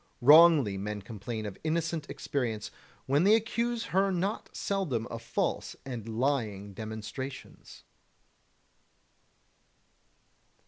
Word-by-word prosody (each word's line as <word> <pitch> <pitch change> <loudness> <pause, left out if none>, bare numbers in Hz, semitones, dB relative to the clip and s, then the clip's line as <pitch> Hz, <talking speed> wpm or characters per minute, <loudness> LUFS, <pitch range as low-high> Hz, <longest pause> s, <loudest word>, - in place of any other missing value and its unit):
Wrongly 145 - +7
men 105 0 -4
complain 110 +1 -6
of 100 -2 -7
innocent 160 -1 -1
experience, 115 -6 -3 0.3
when 140 +4 +3
they 205 +3 +6
accuse 235 +1 -1
her 195 +1 +3
not 190 +4 -2
seldom 165 - -2
of 115 - -5
false - - -2
and 120 -4 -6
lying 110 -5 -1
demonstrations. 110 +6 -7
130 Hz, 95 wpm, -30 LUFS, 110-170 Hz, 0.3 s, Wrongly